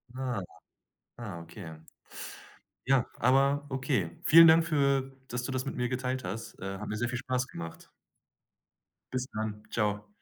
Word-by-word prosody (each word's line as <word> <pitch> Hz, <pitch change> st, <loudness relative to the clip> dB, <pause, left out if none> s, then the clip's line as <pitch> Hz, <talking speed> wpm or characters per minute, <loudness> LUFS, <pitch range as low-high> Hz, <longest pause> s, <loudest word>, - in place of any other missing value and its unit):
Ah, 130 Hz, -5 st, -2 dB
ja. -, -, -7 dB, 0.7 s
Ah, 100 Hz, -8 st, -6 dB
okay. 85 Hz, -1 st, -9 dB, 1.1 s
Ja, 130 Hz, -2 st, +3 dB
aber 140 Hz, +3 st, +3 dB
okay. 130 Hz, -, 0 dB
Vielen 165 Hz, +1 st, +10 dB
Dank 160 Hz, +1 st, +7 dB
für 140 Hz, -4 st, +1 dB
dass 125 Hz, 0 st, -2 dB
du 135 Hz, -, -3 dB
das 130 Hz, +1 st, -2 dB
mit -, -, -4 dB
mir 125 Hz, -1 st, 0 dB
geteilt 130 Hz, 0 st, -2 dB
hast. 100 Hz, +5 st, -5 dB
Äh, 95 Hz, 0 st, -4 dB
hat 105 Hz, -, -6 dB
mir 105 Hz, -, -2 dB
sehr 120 Hz, +2 st, 0 dB
viel 120 Hz, -, -2 dB
Spaß 125 Hz, -1 st, -1 dB
gemacht. 85 Hz, 0 st, -8 dB, 1.2 s
Bis 130 Hz, 0 st, -1 dB
dann, 110 Hz, -1 st, -3 dB
tschau. 105 Hz, -1 st, -1 dB
125 Hz, 160 wpm, -30 LUFS, 105-135 Hz, 1.2 s, Vielen